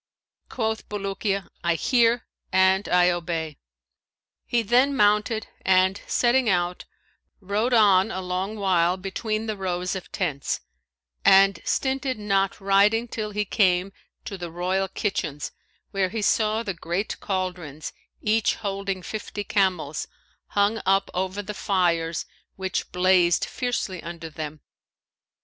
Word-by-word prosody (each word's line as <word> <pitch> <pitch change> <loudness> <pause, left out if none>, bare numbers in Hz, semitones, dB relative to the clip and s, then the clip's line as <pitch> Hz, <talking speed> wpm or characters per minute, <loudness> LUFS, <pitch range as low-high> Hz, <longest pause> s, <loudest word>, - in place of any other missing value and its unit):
Quoth 220 -2 -2
Bulukiya, 195 -1 -2 0.2
'I 170 -1 +2
hear 235 - +2 0.3
and 190 +1 +3
I 180 0 +5
obey;' 165 -3 -3 0.9
he 235 -1 +1
then 250 +6 +3
mounted 210 +1 +2 0.2
and 190 +1 +3
setting 245 0 +3
out, 180 -1 0 0.5
rode 210 +5 -1
on 205 -4 +5
a 190 - -3
long 185 +3 -3
while 185 -3 +2
between 215 +3 -3
the 215 -1 -2
rows 180 -1 -2
of 190 - -7
tents; 150 -8 -2 0.6
and 195 -2 +6
stinted 265 -1 0
not 195 -2 0
riding 200 +4 +3
till 215 -2 -4
he 210 0 -2
came 190 -1 +2 0.3
to 195 - -6
the 175 -1 -5
royal 185 +3 -1
kitchens 155 -9 -3 0.4
where 195 -2 +1
he 220 +2 -3
saw 220 +2 +2
the 200 -4 -3
great 175 +4 -3
cauldrons, 180 -6 -4 0.3
each 215 0 +2
holding 195 -3 -3
fifty 210 0 -5
camels, 185 -8 0 0.5
hung 205 +2 +3
up 195 +1 +2
over 190 +2 -2
the 210 - -5
fires 170 -5 0 0.3
which 190 -1 -3
blazed 180 -1 +3
fiercely 235 -8 -3
under 165 -1 -7
them. 155 -1 -6
195 Hz, 125 wpm, -25 LUFS, 180-210 Hz, 0.9 s, and